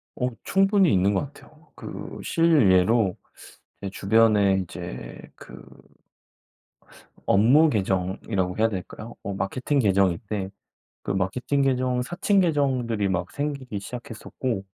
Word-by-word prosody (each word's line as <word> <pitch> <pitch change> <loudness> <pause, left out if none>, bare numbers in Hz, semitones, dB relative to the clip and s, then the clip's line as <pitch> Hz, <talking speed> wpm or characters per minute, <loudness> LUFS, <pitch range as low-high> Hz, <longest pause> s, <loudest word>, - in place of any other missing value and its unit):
어 125 0 -1
충분히 195 -2 +3
있는 95 +2 +2
것 - - +1
같아요. 155 +2 -20
그 - - -8
실 160 - +3
예로 95 +1 +3 0.7
제 100 - -4
주변에 100 -1 +3
이제 65 -7 -8 0.2
그 - - -13 1.6
업무 130 +11 +5
계정이라고 95 -2 -1
해야 115 +1 +3
될까요? 105 +3 -7
어 100 0 -4
마케팅 130 +8 -1
계정인데 100 -1 0 0.5
그 - - -3
마케팅 100 +9 -1
계정 130 -2 +1
사칭 180 +8 +1
계정들이 130 - 0
막 90 -1 -2
생기기 140 -7 -4
시작했었고 120 -2 -5
110 Hz, 250 characters per minute, -24 LUFS, 95-135 Hz, 1.6 s, 업무